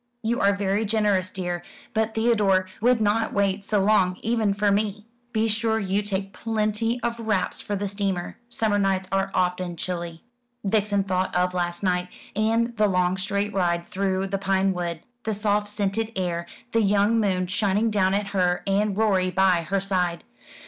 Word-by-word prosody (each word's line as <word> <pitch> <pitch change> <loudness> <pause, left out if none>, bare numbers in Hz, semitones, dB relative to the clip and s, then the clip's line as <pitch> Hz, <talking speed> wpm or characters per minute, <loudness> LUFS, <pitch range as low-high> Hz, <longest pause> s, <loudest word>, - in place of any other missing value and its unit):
"You 235 +2 0
are 200 0 +3
very 200 +1 0
generous, 205 -3 +1
dear; 175 -2 -3 0.3
but 220 0 0
Theodore 210 -5 +3
would 245 +1 +4
not 220 +1 +1
wait 200 0 +1
so 205 -1 +1
long, 190 -3 +3
even 225 -2 +1
for 205 +1 +1
me. 205 0 -1 0.3
Be 225 -1 +1
sure 220 +1 +1
you 200 -1 0
take 195 -1 -3
plenty 225 +3 -1
of 235 0 -1
wraps 215 -5 -1
for 205 - -3
the 200 +1 -2
steamer. 195 -3 -2
Summer 220 -4 +1
nights 190 -1 +1
are 195 0 +1
often 180 -1 0
chilly." 170 -1 -4 0.4
Vixen 205 -1 +1
thought 185 -1 -1
of 180 0 +2
last 175 0 -2
night, 180 -1 +1 0.3
and 225 +2 +1
the 215 0 +4
long 180 -1 +2
straight 200 +2 -2
ride 170 -2 0
through 190 0 -1
the 195 0 -2
pine 195 0 +1
wood, 170 -2 -3 0.2
the 220 -2 -2
soft 205 0 0
scented 210 +2 -1
air, 170 -2 -2 0.2
the 230 - +3
young 205 +2 +3
moon 185 -4 +1
shining 205 +3 +1
down 195 -2 +2
at 200 0 -1
her, 180 -3 +1
and 200 0 +1
Rorie 195 -4 +2
by 185 -2 +3
her 195 0 +2
side. 180 -3 -1
200 Hz, 175 wpm, -25 LUFS, 185-215 Hz, 0.4 s, would